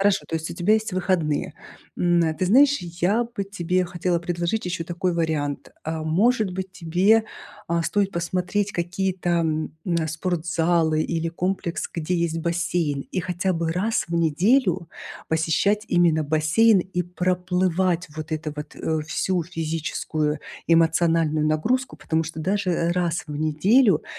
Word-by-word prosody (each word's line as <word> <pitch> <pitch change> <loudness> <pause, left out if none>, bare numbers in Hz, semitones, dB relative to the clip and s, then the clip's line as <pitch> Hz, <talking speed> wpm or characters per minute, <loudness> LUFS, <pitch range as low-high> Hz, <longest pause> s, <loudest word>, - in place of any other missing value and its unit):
Хорошо, 200 0 +2
то 165 - -1
есть 160 0 -4
у - - -6
тебя 185 +5 +3
есть 220 -2 -1
выходные. 175 -5 0 0.4
М, 175 -1 +3 0.2
ты 185 - 0
знаешь, 280 +8 +5
я 180 +7 0
бы 230 -4 -5
тебе 185 -2 -1
хотела 175 0 -1
предложить 175 +4 -2
еще 175 -2 -3
такой 175 +1 -1
вариант. 155 -4 -2
А 160 0 -4
может 205 +5 +2
быть, 190 +1 -4
тебе, 190 +6 +2 0.4
а, 170 0 0
стоит 200 +3 0
посмотреть 180 +4 -1
какие-то, 180 +1 -2
м, 160 -2 0 0.2
а, 160 - -1
спортзалы 165 -1 0
или 165 0 -2
комплекс, 180 0 -2
где 165 +2 -2
есть 170 -1 -1
бассейн? 165 -3 -1
И - - -2
хотя 185 +1 -1
бы 165 -1 -1
раз 210 +6 0
в 170 - -4
неделю 175 - +2 0.4
посещать 165 +7 +1
именно 170 -3 +3
бассейн 160 +9 +4
и 180 0 -2
проплывать 180 0 0
вот 155 0 -6
это 155 -1 -3
вот, 150 0 -8
э, 160 -1 -1
всю 170 +4 -1
физическую, 160 -2 -2 0.3
эмоциональную 165 -1 +3
нагрузку. 220 +13 0
Потому 160 0 -1
что 160 0 -7
даже 180 -1 0
раз 175 -2 -1
в 150 - -6
неделю, 180 - +3
175 Hz, 145 wpm, -24 LUFS, 160-185 Hz, 0.4 s, знаешь